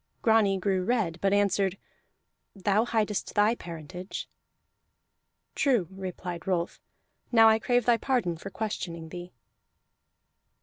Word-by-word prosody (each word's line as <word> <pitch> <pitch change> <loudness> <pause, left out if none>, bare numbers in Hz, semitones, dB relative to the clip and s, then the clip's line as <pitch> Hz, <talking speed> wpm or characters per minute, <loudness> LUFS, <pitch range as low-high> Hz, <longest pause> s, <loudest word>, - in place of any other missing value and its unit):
Grani 220 -4 +4
grew 190 -1 0
red, 190 -6 0
but 195 - +2
answered: 200 -1 +2 0.8
"Thou 200 +3 +2
hidest 215 -3 -1
thy 210 +2 +4
parentage." 180 -1 -7 1.3
"True," 245 - +2
replied 180 -2 -6
Rolf. 175 -2 -1 0.5
"Now 225 -2 +7
I 220 0 +4
crave 245 0 +1
thy 240 -1 +4
pardon 240 -10 0
for 175 +4 -8
questioning 170 -6 -4
thee." 175 +1 -8
195 Hz, 115 wpm, -28 LUFS, 180-220 Hz, 1.3 s, Now